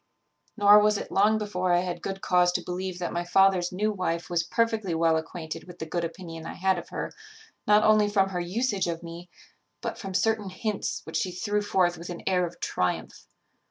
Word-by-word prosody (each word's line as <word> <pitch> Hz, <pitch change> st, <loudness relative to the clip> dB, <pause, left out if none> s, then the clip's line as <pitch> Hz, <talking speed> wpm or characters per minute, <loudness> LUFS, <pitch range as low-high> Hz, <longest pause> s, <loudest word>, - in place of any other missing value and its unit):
"Nor 205 Hz, 0 st, +8 dB
was 210 Hz, 0 st, +3 dB
it -, -, -6 dB
long 210 Hz, +3 st, +4 dB
before 185 Hz, -4 st, -1 dB
I 175 Hz, -, +4 dB
had 180 Hz, -1 st, -4 dB
good 195 Hz, 0 st, -5 dB
cause 180 Hz, -3 st, +3 dB
to -, -, -1 dB
believe 180 Hz, 0 st, -4 dB
that 175 Hz, -1 st, -3 dB
my 175 Hz, 0 st, -1 dB
father's 185 Hz, 0 st, +3 dB
new 210 Hz, +4 st, 0 dB
wife 175 Hz, -4 st, -3 dB
was 170 Hz, -1 st, +2 dB
perfectly 215 Hz, 0 st, 0 dB
well 165 Hz, 0 st, +3 dB
acquainted 160 Hz, 0 st, -5 dB
with 180 Hz, -1 st, -12 dB
the 160 Hz, -, -5 dB
good 170 Hz, +2 st, -2 dB
opinion 165 Hz, -1 st, -6 dB
I -, -, -6 dB
had 190 Hz, -1 st, +1 dB
of -, -, -11 dB
her, -, -, -5 dB, 0.5 s
not 210 Hz, +1 st, +5 dB
only 215 Hz, -1 st, +5 dB
from 195 Hz, -2 st, +2 dB
her 180 Hz, -2 st, -3 dB
usage 200 Hz, +3 st, -1 dB
of 170 Hz, 0 st, -4 dB
me, 170 Hz, +1 st, -9 dB, 0.5 s
but -, -, -5 dB
from 195 Hz, -2 st, -6 dB
certain 220 Hz, -1 st, +1 dB
hints 210 Hz, +2 st, -3 dB
which 160 Hz, -, -4 dB
she 185 Hz, -, -1 dB
threw 205 Hz, +3 st, -1 dB
forth 180 Hz, -4 st, +1 dB
with 170 Hz, -, -8 dB
an 175 Hz, -, -7 dB
air 180 Hz, -2 st, +2 dB
of 170 Hz, -, -13 dB
triumph. 90 Hz, -, -2 dB
180 Hz, 210 wpm, -27 LUFS, 175-205 Hz, 0.5 s, Nor